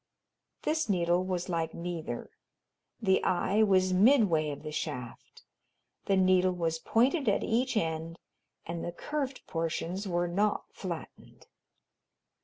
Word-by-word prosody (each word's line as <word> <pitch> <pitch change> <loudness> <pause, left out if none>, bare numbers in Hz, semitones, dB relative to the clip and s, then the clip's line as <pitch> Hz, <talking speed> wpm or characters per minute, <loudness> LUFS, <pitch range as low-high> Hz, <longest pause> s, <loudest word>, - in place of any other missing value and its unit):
This 315 -4 0
needle 175 -1 +2
was 185 -2 -2
like 165 -3 -2
neither; 170 -8 -5 0.7
the 190 -4 +2
eye 190 +3 +2
was 185 -3 +4
midway 190 - +4
of 145 - -6
the 155 - -5
shaft; 125 -5 -6 0.6
the 195 - +2
needle 185 0 +4
was 165 -2 -1
pointed 255 - +2
at 200 - +1
each 245 +1 +1
end 165 -2 -2 0.5
and 170 0 -4
the 175 - -3
curved 275 - -4
portions 170 +3 -3
were 175 -1 0
not 200 +4 +1
flattened. 175 -4 -8
185 Hz, 125 wpm, -30 LUFS, 165-210 Hz, 0.7 s, was